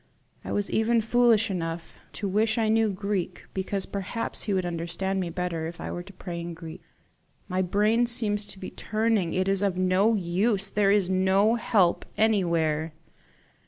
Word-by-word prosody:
I -, -, -6 dB
was 205 Hz, -1 st, -1 dB
even 230 Hz, +1 st, +2 dB
foolish 225 Hz, -1 st, +3 dB
enough 165 Hz, -2 st, -4 dB, 0.2 s
to 205 Hz, -, -3 dB
wish 215 Hz, +4 st, +1 dB
I 220 Hz, -2 st, +2 dB
knew 220 Hz, 0 st, +3 dB
Greek, 195 Hz, -2 st, -3 dB
because 190 Hz, 0 st, -2 dB
perhaps 200 Hz, +4 st, -4 dB
he 210 Hz, -, -1 dB
would 185 Hz, -1 st, 0 dB
understand 175 Hz, +3 st, -2 dB
me 180 Hz, -2 st, -2 dB
better 170 Hz, -2 st, -3 dB
if 165 Hz, 0 st, -8 dB
I -, -, -5 dB
were 175 Hz, -, -4 dB
to 200 Hz, +3 st, -13 dB
pray 175 Hz, -2 st, -6 dB
in 170 Hz, 0 st, -6 dB
Greek. 165 Hz, -1 st, -9 dB, 0.7 s
My 185 Hz, 0 st, 0 dB
brain 210 Hz, +6 st, +2 dB
seems 210 Hz, -3 st, +1 dB, 0.3 s
turning. 215 Hz, -5 st, 0 dB
It 185 Hz, +1 st, +1 dB
is 195 Hz, 0 st, +2 dB
of 195 Hz, -3 st, 0 dB
no 185 Hz, +4 st, +3 dB
use! 195 Hz, +2 st, 0 dB
There 205 Hz, -1 st, +2 dB
is 200 Hz, -3 st, +3 dB
no 190 Hz, +3 st, +3 dB
help 205 Hz, -6 st, +2 dB
anywhere!" 165 Hz, -7 st, +1 dB
195 Hz, 165 wpm, -26 LUFS, 175-215 Hz, 0.7 s, foolish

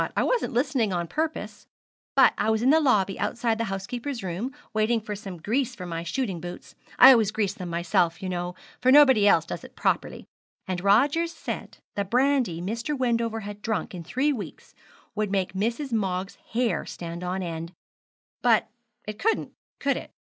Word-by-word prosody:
I -, -, +3 dB
wasn't 485 Hz, -, 0 dB
listening 250 Hz, -4 st, +1 dB
on 175 Hz, -1 st, -1 dB
purpose; 315 Hz, -, -4 dB, 0.5 s
but -, -, +6 dB
I 215 Hz, -, 0 dB
was 220 Hz, +1 st, +1 dB
in 260 Hz, -, +5 dB
the 320 Hz, -, +6 dB
lobby 210 Hz, -10 st, +2 dB
outside 225 Hz, +2 st, 0 dB
the 230 Hz, -, 0 dB
housekeeper's 230 Hz, +6 st, -4 dB
room, 190 Hz, +8 st, -3 dB, 0.2 s
waiting 220 Hz, +2 st, +2 dB
for 210 Hz, -1 st, -6 dB
some 195 Hz, -3 st, -8 dB
grease 245 Hz, -, -1 dB
for 180 Hz, -, -7 dB
my 165 Hz, -1 st, -4 dB
shooting 185 Hz, 0 st, -3 dB
boots. 175 Hz, +1 st, -8 dB, 0.2 s
I 265 Hz, -, +10 dB
always 225 Hz, -5 st, +4 dB
grease 210 Hz, -3 st, -1 dB
them 180 Hz, -1 st, -7 dB
myself, 170 Hz, 0 st, +1 dB
you 190 Hz, -, -5 dB
know, 180 Hz, 0 st, -3 dB, 0.3 s
for 255 Hz, -, +4 dB
nobody 265 Hz, -7 st, +7 dB
else 165 Hz, -5 st, +5 dB
does -, -, -6 dB
it -, -, -13 dB
properly; -, -, -1 dB, 0.4 s
and 185 Hz, -1 st, -3 dB
Rogers 285 Hz, +12 st, +3 dB
said -, -, -6 dB, 0.2 s
the 200 Hz, -, 0 dB
brandy 245 Hz, -4 st, +1 dB
Mr. 230 Hz, +10 st, -3 dB
Wendover 230 Hz, -3 st, 0 dB
had 205 Hz, 0 st, -8 dB
drunk 220 Hz, -2 st, -2 dB
in 175 Hz, -2 st, -6 dB
three 270 Hz, -, 0 dB
weeks 220 Hz, -6 st, -8 dB, 0.4 s
would 215 Hz, -1 st, -1 dB
make 190 Hz, -2 st, -1 dB
Mrs. 235 Hz, +8 st, -2 dB
Moggs' 190 Hz, -4 st, -2 dB
hair 240 Hz, 0 st, +1 dB
stand 170 Hz, 0 st, -6 dB
on 185 Hz, +1 st, -2 dB
end; 165 Hz, -1 st, -5 dB, 0.7 s
but 230 Hz, -3 st, +3 dB, 0.4 s
it 215 Hz, 0 st, -6 dB
couldn't, 450 Hz, +2 st, 0 dB, 0.3 s
could 280 Hz, 0 st, +1 dB
it? -, -, -8 dB
215 Hz, 180 wpm, -26 LUFS, 185-250 Hz, 0.7 s, I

